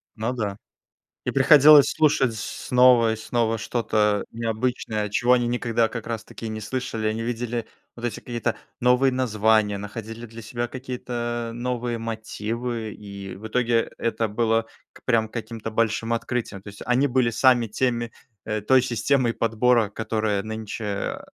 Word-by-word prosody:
Ну 115 Hz, +3 st, -2 dB
да. 105 Hz, -4 st, -3 dB, 0.7 s
И -, -, 0 dB
приходилось 145 Hz, +1 st, +7 dB
слушать 140 Hz, -6 st, +2 dB
снова 120 Hz, +1 st, +3 dB
и -, -, -3 dB
снова 115 Hz, 0 st, -1 dB
что-то 105 Hz, -2 st, 0 dB
необычное, 115 Hz, -1 st, -2 dB
чего 125 Hz, +4 st, +2 dB
они 120 Hz, -1 st, +2 dB
никогда 120 Hz, -1 st, +1 dB
как 115 Hz, -2 st, -6 dB
раз-таки 115 Hz, 0 st, -6 dB
и -, -, -4 dB
не 110 Hz, 0 st, -4 dB
слышали. 110 Hz, -1 st, -3 dB
Они 110 Hz, +1 st, -1 dB
видели 120 Hz, 0 st, -3 dB, 0.3 s
вот 120 Hz, -, -11 dB
эти 115 Hz, -, -3 dB
какие-то 120 Hz, -2 st, -3 dB, 0.2 s
новые 125 Hz, +1 st, +4 dB
названия, 110 Hz, -4 st, +2 dB
находили 110 Hz, +3 st, -7 dB
для 115 Hz, +1 st, -10 dB
себя 120 Hz, +2 st, -3 dB
какие-то 120 Hz, -2 st, -4 dB
новые 120 Hz, -1 st, -2 dB
мотивы. 115 Hz, 0 st, -4 dB
И 100 Hz, -2 st, -9 dB
в 110 Hz, +3 st, -8 dB
итоге 120 Hz, 0 st, +1 dB
это 115 Hz, -1 st, -1 dB
было 115 Hz, +1 st, +1 dB, 0.3 s
к -, -, -19 dB
прям 110 Hz, -3 st, +2 dB
каким-то 115 Hz, -1 st, -6 dB
большим 115 Hz, +1 st, 0 dB
открытием. 115 Hz, -4 st, -2 dB
То 100 Hz, -, -16 dB
есть 100 Hz, 0 st, -10 dB
они 125 Hz, +4 st, +3 dB
были 125 Hz, -2 st, +2 dB
сами 120 Hz, -1 st, +4 dB
теми, 120 Hz, +1 st, -1 dB, 0.3 s
э, 110 Hz, -1 st, -2 dB
той 130 Hz, +5 st, +4 dB
системой 120 Hz, +1 st, +1 dB
подбора, 115 Hz, -1 st, +2 dB
которая 110 Hz, -2 st, -1 dB
нынче, 110 Hz, 0 st, -6 dB
э, 100 Hz, -1 st, -3 dB
115 Hz, 150 wpm, -24 LUFS, 110-125 Hz, 0.7 s, приходилось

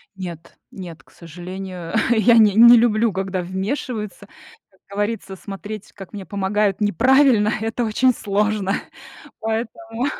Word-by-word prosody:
Нет, 170 Hz, -3 st, -9 dB
нет, 175 Hz, -4 st, -10 dB
к -, -, -26 dB
сожалению, 180 Hz, +1 st, -8 dB, 0.2 s
я 235 Hz, 0 st, +4 dB
не 215 Hz, -3 st, +6 dB
не 235 Hz, +2 st, +9 dB
люблю, 225 Hz, -1 st, +2 dB
когда 190 Hz, -1 st, -3 dB
вмешиваются. 210 Hz, +4 st, -5 dB, 0.4 s
Как 190 Hz, -2 st, -31 dB
говорится, 205 Hz, -1 st, -3 dB
смотреть, 205 Hz, +2 st, -8 dB
как 195 Hz, 0 st, -12 dB
мне 200 Hz, -2 st, -7 dB
помогают 200 Hz, 0 st, -1 dB
неправильно, 230 Hz, +1 st, +3 dB
это 225 Hz, +2 st, -2 dB
очень 245 Hz, +3 st, +2 dB
сложно, 205 Hz, -1 st, -1 dB, 0.7 s
поэтому 225 Hz, +1 st, -3 dB
210 Hz, 125 wpm, -21 LUFS, 190-225 Hz, 0.7 s, не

